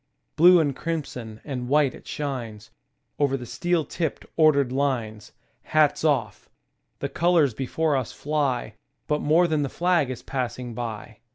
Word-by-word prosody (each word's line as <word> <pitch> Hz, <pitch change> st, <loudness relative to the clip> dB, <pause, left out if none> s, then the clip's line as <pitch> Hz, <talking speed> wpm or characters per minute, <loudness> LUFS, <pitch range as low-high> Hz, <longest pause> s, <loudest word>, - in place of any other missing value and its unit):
Blue 175 Hz, +2 st, +7 dB
and 145 Hz, -4 st, +1 dB
crimson 125 Hz, -10 st, -5 dB
and 125 Hz, -4 st, -4 dB
white 145 Hz, -2 st, +3 dB
it -, -, -14 dB
shines, 120 Hz, -7 st, -5 dB, 0.5 s
Over 140 Hz, -2 st, +2 dB
the 125 Hz, -, -8 dB
steel 175 Hz, +4 st, -1 dB
tipped, 165 Hz, -3 st, -3 dB
ordered 140 Hz, -5 st, +4 dB
lines. 120 Hz, -6 st, -2 dB, 0.3 s
Hats 155 Hz, -1 st, +2 dB
off! 130 Hz, -10 st, 0 dB, 0.5 s
The -, -, -3 dB
colors 165 Hz, -7 st, +2 dB
before 145 Hz, +5 st, -1 dB
us 130 Hz, -4 st, -2 dB
fly, 140 Hz, -7 st, -1 dB, 0.3 s
But 150 Hz, 0 st, 0 dB
more 160 Hz, +4 st, +4 dB
than 155 Hz, -2 st, 0 dB
the 140 Hz, -, -1 dB
flag 175 Hz, -4 st, +1 dB
is 130 Hz, -, -6 dB
passing 125 Hz, -2 st, -4 dB
by. 110 Hz, -2 st, -6 dB
140 Hz, 150 wpm, -25 LUFS, 125-155 Hz, 0.5 s, Blue